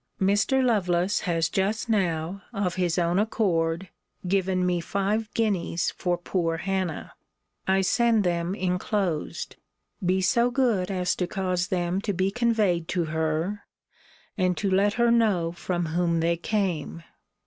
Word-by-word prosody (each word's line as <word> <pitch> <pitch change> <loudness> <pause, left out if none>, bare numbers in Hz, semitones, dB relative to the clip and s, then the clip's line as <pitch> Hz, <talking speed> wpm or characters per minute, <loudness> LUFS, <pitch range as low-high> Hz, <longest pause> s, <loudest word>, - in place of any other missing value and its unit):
Mr. 205 +7 +2
Lovelace 185 -4 +1
has 165 -2 0
just 205 +7 -1
now, 185 -3 0
of 200 -4 -1
his 175 -1 0
own 175 +1 +2
accord, 180 -5 0 0.4
given 185 -1 +1
me 175 -1 +1
five 205 +5 -1
guineas 195 -6 0
for 175 -1 -1
poor 170 -2 -1
Hannah. 185 -1 -3 0.5
I 190 0 +3
send 230 +2 +3
them 175 +1 -1
inclosed. 180 -2 -2 0.5
Be 185 +1 +2
so 235 +6 +3
good 240 -8 +1
as 180 -2 0
to 180 - -1
cause 180 -1 -1
them 180 +1 -1
to 205 -1 -2
be 190 +2 0
conveyed 210 -8 +1
to 175 -2 0
her, 160 +6 -1 0.8
and 180 -1 +1
to 200 -2 -1
let 200 +2 +3
her 235 +1 +3
know 205 -8 +2
from 175 0 -2
whom 170 +1 0
they 170 +1 +2
came. 170 -4 -2
185 Hz, 140 wpm, -26 LUFS, 175-205 Hz, 0.8 s, I